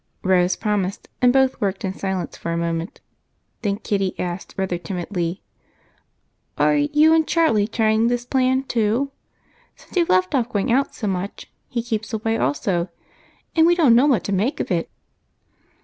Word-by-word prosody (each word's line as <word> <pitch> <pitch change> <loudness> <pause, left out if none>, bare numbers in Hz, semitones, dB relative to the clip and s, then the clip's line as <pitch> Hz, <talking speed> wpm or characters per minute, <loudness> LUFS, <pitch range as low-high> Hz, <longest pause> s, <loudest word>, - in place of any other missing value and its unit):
Rose 185 -1 +3
promised, 205 -3 -2
and 250 -1 +6
both 265 0 +2
worked 195 -1 -1
in 190 - -2
silence 190 -2 -3
for 170 - -5
a 170 - -1
moment, 170 +1 -3 0.6
then 200 -2 -1
Kitty 195 -3 -2
asked 175 +1 -5
rather 190 -2 -1
timidly: 175 0 -4 1.1
"Are - - +3
you 300 +2 +4
and 320 -1 +3
Charlie 270 -12 +2
trying 220 0 +2
this 245 0 -1
plan 260 0 +1
too? 240 +2 0 0.6
Since - - -17
you've 345 -2 +2
left 185 0 +2
off 250 -4 +1
going 220 +1 -1
out 270 +3 +1
so 225 - -5
much, 195 0 -4 0.2
he 235 -2 -2
keeps 225 -1 -3
away 225 +1 0
also, 170 - 0 0.7
and 325 0 +5
we 345 - +4
don't 305 -9 +5
know 250 +5 +5
what 250 -10 +2
to 200 - -2
make 215 +9 0
of - - -3
it." 170 -2 0
215 Hz, 165 wpm, -22 LUFS, 185-255 Hz, 1.1 s, and